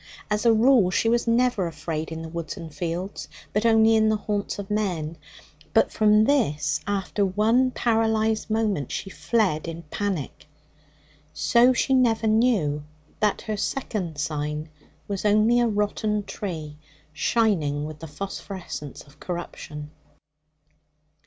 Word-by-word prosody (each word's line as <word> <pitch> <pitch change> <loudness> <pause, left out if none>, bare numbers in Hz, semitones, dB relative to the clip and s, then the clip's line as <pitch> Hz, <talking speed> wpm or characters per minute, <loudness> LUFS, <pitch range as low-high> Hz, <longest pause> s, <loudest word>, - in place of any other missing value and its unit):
As 210 +3 +1
a - - +7
rule, 225 -3 +5
she 205 - +1
was 235 +1 +1
never 235 -5 +2
afraid 160 0 -4
in 160 0 -5
the - - -6
woods 170 -1 -5
and 160 -2 -8
fields, 175 +4 -4 0.3
but 210 +3 +2
only 225 0 +5
in 220 0 +4
the 215 - +3
haunts 205 -1 -3
of 200 0 -6
men. 175 -7 -1 0.6
But 225 - +4
from 210 0 +4
this, 150 - +1
after 200 0 -1
one 220 +7 +3
paralysed 220 -2 +1
moment, 215 - 0
she 195 - -4
fled 190 -11 0
in 165 0 -6
panic. 190 -8 -3 0.9
So 240 +2 +4
she 260 +2 +1
never 235 -4 +3
knew 215 -10 +2 0.4
that 210 -1 +1
her 215 - -3
second 200 - -3
sign 150 +1 -3 0.4
was 200 -2 -3
only 215 +3 +4
a 240 - +3
rotten 210 0 0
tree, 165 -7 -6 0.3
shining 160 -9 +1
with 155 0 -8
the 160 - -8
phosphorescence 185 -3 -7
of 140 0 -21
corruption. 150 -4 -6
205 Hz, 140 wpm, -25 LUFS, 160-220 Hz, 0.9 s, a